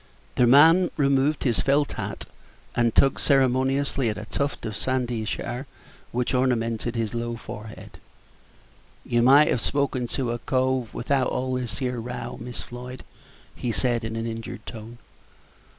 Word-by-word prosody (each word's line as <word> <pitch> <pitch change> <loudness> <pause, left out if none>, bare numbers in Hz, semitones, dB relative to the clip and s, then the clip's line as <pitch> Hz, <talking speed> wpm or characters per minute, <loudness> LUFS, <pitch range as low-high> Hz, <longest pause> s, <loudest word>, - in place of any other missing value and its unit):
The 125 - +3
man 165 +8 +7
removed 140 +1 +2
his 120 -5 +1
felt 140 +1 +2
hat, - - -5 0.5
and 120 -2 +1
tugged 135 -1 +4
ceremoniously 135 -1 +2
at 105 - -3
a 105 - -6
tuft 140 +5 -3
of 110 - -4
sandyish 120 -3 -1
hair 125 +3 -5 0.4
which 125 +2 -1
ornamented 120 -2 0
his 115 -1 -2
low 120 0 -2
forehead. 110 -1 -10 1.1
"You 120 0 +2
might 140 +5 +6
have 120 - +1
spoken 135 -3 0
to 125 -4 -1
a 120 - -3
cove 130 -2 0
without 130 +1 +1
all 130 0 -2
this 125 -2 -3
here 125 -2 -2
row, 125 +2 -6
Miss 125 +1 -6
Floyd," 125 +1 -9 0.5
he 120 - -3
said, 120 0 +1
in 110 0 -4
an 115 0 -3
injured 115 -1 -6
tone. 115 +1 -9
125 Hz, 150 wpm, -25 LUFS, 115-135 Hz, 1.1 s, man